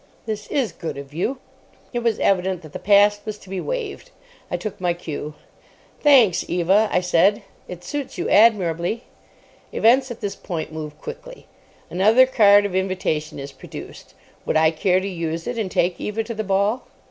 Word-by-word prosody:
This 210 -2 -4
is 265 -6 -1
good 165 - -6
of 140 0 -9
you!" 210 - -2 0.6
It 240 - 0
was 230 -2 0
evident 185 -2 +1
that 155 -2 -12
the - - -5
past 205 +1 +4
was 215 -1 -5
to 195 - -17
be 190 - -3
waived. 480 -5 -5 0.4
I - - -1
took 215 -4 -6
my 175 -1 +1
cue. 150 -3 -6 0.6
"Thanks, 255 - +5
Eva," 190 +5 +3
I 180 - +2
said; 195 +4 +3 0.2
"it 180 -1 -9
suits 285 +8 -5
you - - -2
admirably." 205 -1 +3 0.7
Events 255 +4 +3
at 240 - -7
this 205 -3 -4
point 160 -3 -5
move 155 -1 -7
quickly. - - -9 0.5
Another 215 +8 +5
card 205 -5 +5
of 200 - -3
invitation 185 -5 -1
is 140 0 -7
produced. - - -11 0.3
Would - - 0
I 160 0 +4
care 180 +3 +2
to 190 - -4
use 165 -3 -4
it, 240 - -3
and 205 -4 -2
take 175 0 0
Eva 215 +2 -2
to 230 +1 -6
the 220 0 -3
ball? 200 +5 0
195 Hz, 180 wpm, -22 LUFS, 170-225 Hz, 0.7 s, Thanks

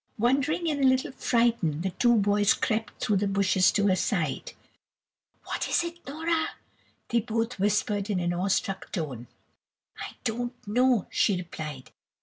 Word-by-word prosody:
Wondering, 280 +9 +1
and 295 -3 0
a - - +6
little 260 0 +2
frightened, 230 - +1
the 190 - -1
two 240 +5 +3
boys 205 -1 +3
crept 220 -1 -2
through 210 - +2
the 200 +1 0
bushes 195 -1 +3
to 205 - +2
her 190 -2 +4
side. 175 - -1 0.9
"What - - -3
is - - +2
it, 340 0 -6
Nora?" 320 +3 -1 0.5
they 235 - +3
both 230 0 -2
whispered 205 0 +1
in 195 -3 0
an 175 0 0
awestruck 190 +1 -1
tone. 130 -8 -4 0.7
"I - - -7
don't 240 +2 -2
know," 245 -1 +3
she 200 - +2
replied. 155 -6 -7
210 Hz, 150 wpm, -27 LUFS, 190-245 Hz, 0.9 s, a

